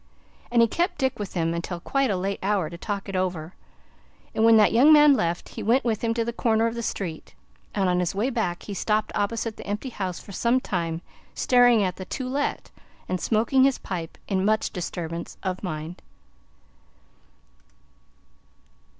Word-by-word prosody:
And 235 -1 +5
he - - +4
kept 350 - -1
Dick 265 -4 -1
with 205 -2 -5
him 165 -1 0
until 170 +1 -4
quite 275 +8 0
a 195 - 0
late 195 +2 -2
hour 190 -5 0
to 170 - -7
talk 200 -1 -4
it 195 - -5
over, 180 -2 -2 0.8
and 220 - +1
when 225 0 +7
that 210 - +5
young 265 +7 +6
man 295 -1 +8
left, 170 -8 -1
he - - -7
went 245 +5 +2
with 225 -2 -1
him 230 - +1
to 230 -1 0
the 235 - -3
corner 225 -1 +2
of 230 - 0
the 235 - -4
street; 175 -7 -5 0.4
and 195 -2 +2
on 180 0 +2
his 180 +1 -1
way 230 +7 0
back 180 -8 -2
he 205 - -6
stopped 215 +2 0
opposite 220 +2 -2
the - - -9
empty 210 +6 -3
house 190 -7 -4
for - - -12
some 235 +6 +2
time, 170 -6 -3 0.3
staring 245 -3 +5
at 180 -1 -2
the 185 - -6
"To 255 +6 -4
Let," 280 +3 -2 0.4
and 185 -1 -2
smoking 235 +4 +3
his 270 -1 +3
pipe, 170 -3 -6
in 190 -1 0
much 215 +2 +1
disturbance 170 -2 -5
of 185 -1 -2
mind. 165 -2 -5
205 Hz, 185 wpm, -25 LUFS, 180-235 Hz, 0.8 s, man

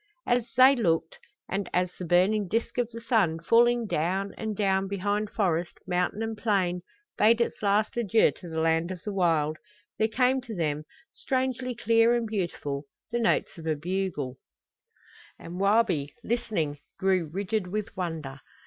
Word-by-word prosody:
And 245 - +3
as 240 - -13
they 260 +2 +8
looked 230 - 0 0.3
and 195 0 -3
as 180 0 +1
the 180 - -7
burning 190 +4 +3
disk 230 +5 -1
of 240 -2 0
the 230 -1 -8
sun, 215 -9 +2
falling 235 +6 +4
down 190 +2 -1
and 220 -2 -4
down 195 -1 +1
behind 205 +2 -1
forest, 175 -5 -1
mountain 180 +4 -1
and 225 0 -3
plain, 190 -5 0 0.4
bade 225 +2 +5
its 235 - -1
last 210 +1 +1
adieu 225 -2 +3
to 175 - -10
the 160 0 -3
land 165 +1 +2
of 185 -1 -7
the 210 - -4
wild, 160 -5 +1 0.4
there 220 - +3
came 255 +3 +2
to 235 -4 -7
them, 155 -3 -1 0.3
strangely 255 -2 -2
clear 230 0 +4
and 235 -1 0
beautiful, 170 -9 -3 0.3
the 240 - 0
notes 225 -5 +1
of 160 - -7
a 155 - +1
bugle. 165 -5 -3 1.0
And 175 +2 -8
Wabi, 195 -8 +2
listening, 205 -11 -1 0.2
grew 190 -3 +1
rigid 200 +2 -2
with 210 +2 -4
wonder. 160 -7 -4
195 Hz, 165 wpm, -27 LUFS, 170-225 Hz, 1.0 s, they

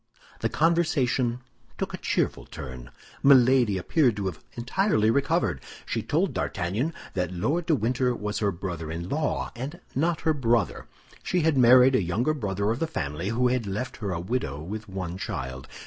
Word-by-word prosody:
The - - 0
conversation 140 -7 +1 0.4
took - - -3
a - - -3
cheerful - - -1
turn. 65 -3 -8 0.3
Milady 130 -6 +5
appeared 120 - +2
to 100 -2 -3
have 90 -4 -4
entirely 120 - +1
recovered. 140 - +1 0.2
She - - -2
told - - 0
D'Artagnan 100 - -1 0.2
that 90 -1 -1
Lord 145 - -1
de 160 - +4
Winter 125 0 0
was 105 -1 -3
her 100 -2 +1
brother 85 -3 -5
in 85 +2 -4
law, 150 +1 -1
and 140 +9 -6
not 165 +5 0
her 160 - +2
brother. 120 -6 0 0.3
She 180 - 0
had 160 -1 +2
married 130 +1 +7
a 125 - +3
younger 110 - 0
brother 100 -6 -1
of 120 - -2
the 165 - 0
family, 75 - -3
who 125 +2 +2
had 125 -4 -1
left 105 +6 -4
her 100 -4 -3
a 85 - -2
widow 85 - -2
with 105 +7 -6
one 95 -1 -5
child. 65 -5 -5
115 Hz, 175 wpm, -26 LUFS, 95-135 Hz, 0.4 s, married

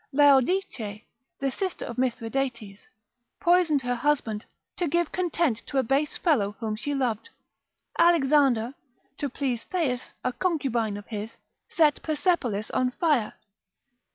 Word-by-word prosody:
Laodice, 270 - +3 0.4
the 275 0 0
sister 375 +5 -3
of 240 +1 -6
Mithridates, 235 -4 -2 0.5
poisoned 340 -6 +3
her 245 0 0
husband, 240 -5 0 0.3
to 350 - 0
give 340 +2 0
content 335 -9 0
to 275 - -3
a 265 - +4
base 275 +5 0
fellow 220 - +2
whom 220 -2 -2
she 285 +6 -3
loved. 250 - -1 0.7
Alexander, 275 -8 +4 0.5
to 285 - -1
please 250 -3 -2
Thais, 280 -9 -2
a 255 - 0
concubine 245 - 0
of 205 - -9
his, 215 0 -6 0.3
set 305 -3 +3
Persepolis 290 - 0
on 255 0 +1
fire. 270 -5 +1
270 Hz, 125 wpm, -26 LUFS, 230-305 Hz, 0.7 s, a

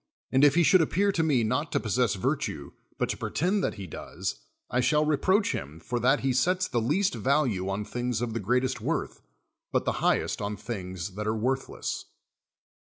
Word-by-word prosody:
And 130 +2 +4
if 145 0 +6
he 175 - +5
should 185 +2 +6
appear 195 +6 +2
to 170 - 0
me 145 -7 +2
not 130 +8 -1
to - - +3
possess 115 0 +1
virtue, 95 - -2 0.3
but - - 0
to - - -2
pretend 190 +5 0
that - - -1
he 100 -3 -7
does, 85 - -5 0.3
I 125 - 0
shall 150 +4 +3
re 150 0 +3
proach 200 +8 +2
him 75 +2 -5
for 120 +9 -3
that 130 +5 +3
he 135 -1 +1
sets 180 +8 +2
the 120 -2 0
least 180 - +1
value 125 -9 +1
on 100 +2 -2
things 120 -1 -2
of 120 -1 -2
the 115 - -2
greatest 125 +5 0
worth, - - -2 0.5
but - - +1
the - - +2
highest - - +1
on 105 0 -3
things 95 -4 -5
that 105 +2 -4
are 110 +1 0
worthless. 130 +4 -2
125 Hz, 200 wpm, -28 LUFS, 105-150 Hz, 0.5 s, if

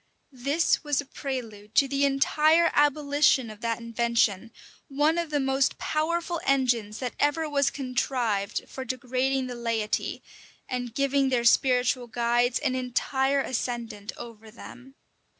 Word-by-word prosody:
[] - - -45 0.2
This 325 +5 +2
was 295 -2 0
a 285 - -3
prelude 230 -7 -6
to 275 - +5
the 280 +1 +1
entire 310 +4 +3
abolition 290 -4 +3
of 215 0 -13
that 230 -1 -1
invention, 230 -2 0 0.4
one 295 +4 +1
of 340 -2 -3
the 295 -1 0
most 270 0 +1
powerful 335 +2 -1
engines 240 -6 +1
that 250 -2 -4
ever 300 +2 +1
was 280 -4 +1
contrived 250 -6 -2
for 265 - -7
degrading 255 +1 -1
the 250 - -5
laity, 230 -3 -2 0.4
and 245 -2 -4
giving 275 -1 +2
their 245 -2 +1
spiritual 250 0 +3
guides 240 +1 +1
an 285 -3 -1
entire 265 +2 0
ascendant 235 -5 -4
over 225 -2 -10
them. 245 +4 -13
255 Hz, 140 wpm, -26 LUFS, 235-280 Hz, 0.4 s, to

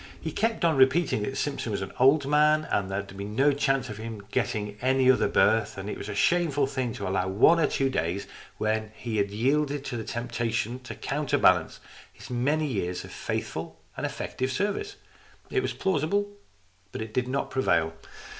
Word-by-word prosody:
He 160 - -4
kept 225 +1 0
on 160 -4 +3
repeating 135 -1 +3
that 135 +6 -3
Simpson 140 -5 -2
was 100 -2 -2
an 95 - -7
old 135 +3 +5
man 150 +1 +4
and 95 -1 0
that 95 +1 -3
there 95 - -11
was 100 - -4
no 135 +8 +3
chance 135 -2 +1
of 105 -4 -7
his 115 +1 -5 0.2
getting 105 -4 -1
any 130 0 +4
other 130 - +2
berth, 105 +2 +2
and 95 +1 -5
that - - -3
it - - -7
was 100 - -6
a 105 - -4
shameful 150 - +2
thing 130 -3 -2
to - - -5
allow 95 0 0
the 95 - -3
one 165 - +6
or 155 - +3
two 135 - 0
days 95 -4 -1 0.3
when 110 0 -1
he 115 -2 -4
had 100 -1 +1
yielded 140 +6 0
to 115 -2 -4
temptation 115 0 -2
to 130 - -8
counterbalance 135 - +2 0.3
his - - -12
many 145 +6 +1
years 90 -9 -2
of - - -11
faithful - - -4 0.2
and - - -2
effective 130 0 -3
service. 210 - -2 0.6
It 395 - +2
was - - -2
plausible, 190 +4 0 0.6
but - - -4
it 110 -1 -10
did 125 +1 0
not 135 +2 -2
prevail. 80 -11 +1
130 Hz, 195 wpm, -27 LUFS, 105-145 Hz, 0.6 s, one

